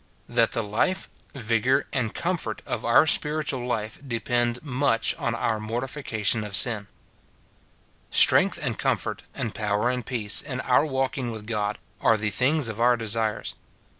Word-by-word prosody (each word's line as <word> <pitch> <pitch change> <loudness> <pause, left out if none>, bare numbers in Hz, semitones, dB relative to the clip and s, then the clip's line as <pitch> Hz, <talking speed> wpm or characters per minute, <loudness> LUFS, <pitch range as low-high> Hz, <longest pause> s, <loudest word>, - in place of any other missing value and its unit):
That 115 -1 +2
the 115 - -1
life, 145 - -1 0.3
vigour, 125 +3 +1
and 120 -5 -1
comfort 170 -11 -2
of 120 - -4
our 120 +6 +5
spirit 150 -1 +2
ual 125 -2 -2
life 110 -3 -3
depend 120 0 -1
much 130 -4 0
on 120 -1 -1
our 110 -2 -1
mortification 115 -1 -2
of 105 -1 -4
sin. 105 0 +4 1.2
Strength - - +6
and - - -3
comfort, - - -2
and 110 - -4
power 105 +3 0
and 125 -1 -3
peace, 110 -3 0
in 130 -3 -5
our 130 +4 +2
walking 135 -2 -2
with 110 -2 -7
God, 105 -2 -2 0.2
are 115 - +3
the 105 -1 -2
things 135 +6 +1
of 115 0 -4
our 120 0 +4
desires. 110 -1 -1
115 Hz, 155 wpm, -25 LUFS, 110-130 Hz, 1.2 s, Strength